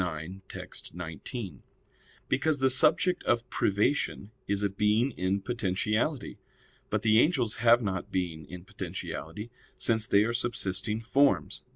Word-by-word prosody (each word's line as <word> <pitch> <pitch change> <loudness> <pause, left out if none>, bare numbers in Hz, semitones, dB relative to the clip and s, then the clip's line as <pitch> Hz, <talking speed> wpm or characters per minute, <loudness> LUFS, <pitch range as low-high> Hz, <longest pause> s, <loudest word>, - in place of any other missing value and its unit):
ix, 85 -1 -4 0.2
text. - - -7
19), 90 - -6 0.7
because 150 +2 +1
the 130 -1 +3
subject 165 +7 +4
of 120 0 +1
privation 100 0 0 0.2
is 100 0 0
a 100 - +2
being 105 +6 +2
in 95 -1 -1
potentiality. 110 - -1 0.5
But - - -1
the 110 0 +5
angels 125 -7 +2
have 120 +1 +5
not 95 -3 -3
being 85 -4 -3
in 90 0 -9
potentiality, 105 +2 -6 0.3
since 110 -1 0
they 100 +1 +5
are 115 +2 -1
subsisting 110 -3 -1
forms. 135 +5 +2
110 Hz, 135 wpm, -29 LUFS, 95-120 Hz, 0.7 s, the